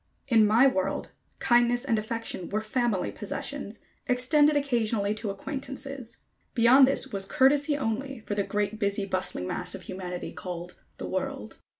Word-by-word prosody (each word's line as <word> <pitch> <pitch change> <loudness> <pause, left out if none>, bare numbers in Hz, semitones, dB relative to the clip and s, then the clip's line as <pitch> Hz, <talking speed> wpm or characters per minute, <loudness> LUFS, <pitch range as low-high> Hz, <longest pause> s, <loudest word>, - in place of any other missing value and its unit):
In 225 -5 +5
my 225 +5 +5
world, 190 -9 0 0.3
kindness 240 +1 +3
and 225 -5 +2
affection 220 -4 -4
were 210 - 0
family 220 -3 0
possessions, - - -5 0.3
extended 290 +4 +3
occasionally 230 -7 +1
to 215 0 -4
acquaintances. 270 +2 -5 0.4
Beyond 255 +3 +7
this 270 -1 0
was 195 -1 -1
courtesy 285 +6 +3
only 265 0 -3
for - - -2
the 205 - +1
great 205 +1 -2
busy 200 -1 0
bustling 185 - 0
mass 180 - -3
of 190 - -9
humanity 180 -1 -5
called 175 -1 -6 0.2
"the - - -5
world." - - -4
225 Hz, 150 wpm, -27 LUFS, 200-265 Hz, 0.4 s, Beyond